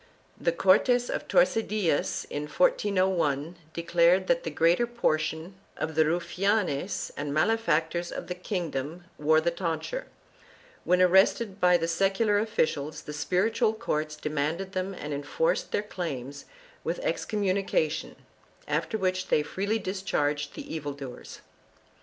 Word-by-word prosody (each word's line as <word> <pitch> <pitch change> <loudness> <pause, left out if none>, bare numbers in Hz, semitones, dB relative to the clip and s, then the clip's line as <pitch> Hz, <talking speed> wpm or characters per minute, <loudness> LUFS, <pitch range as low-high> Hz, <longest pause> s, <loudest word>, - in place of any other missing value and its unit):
The 170 - +2
Cortes 240 +8 +3
of - - -3
Tordesillas, 215 - +1
in 145 +1 -3
1401, 180 -3 +1 0.2
declared 170 +2 +3
that 255 +5 +2
the 165 - -2
greater 170 +9 +3
portion 160 -6 -1 0.2
of 160 - -3
the 160 0 +4
rufianes 180 +1 0
and 145 0 -3
malefactors 170 -1 +1
of - - -5
the 180 - -4
king 180 -2 -3
dom 150 +7 -4 0.2
wore 155 +1 +4
the 170 +2 +1
tonsure; 170 - -3 0.8
when 180 +1 +4
arrested 190 +3 +3
by 180 0 +6
the 165 -1 -2
secular 195 +4 +2
officials 155 -8 -1
the 150 - -7
spiritual 215 +9 +1
courts 155 -9 -2
demanded 155 +5 -2
them 190 0 -3
and 150 -3 -5
enforced 485 - -1
their 205 - 0
claims 145 -9 -5 0.4
with - - -2
excommunication, 195 - -1 0.5
after 220 - -1
which 185 -2 -1
they 150 - +3
freely 200 +8 -1
discharged 150 -8 -2
the - - -7
evil 145 -3 -4
doers. 135 -3 -9
175 Hz, 130 wpm, -28 LUFS, 155-200 Hz, 0.8 s, by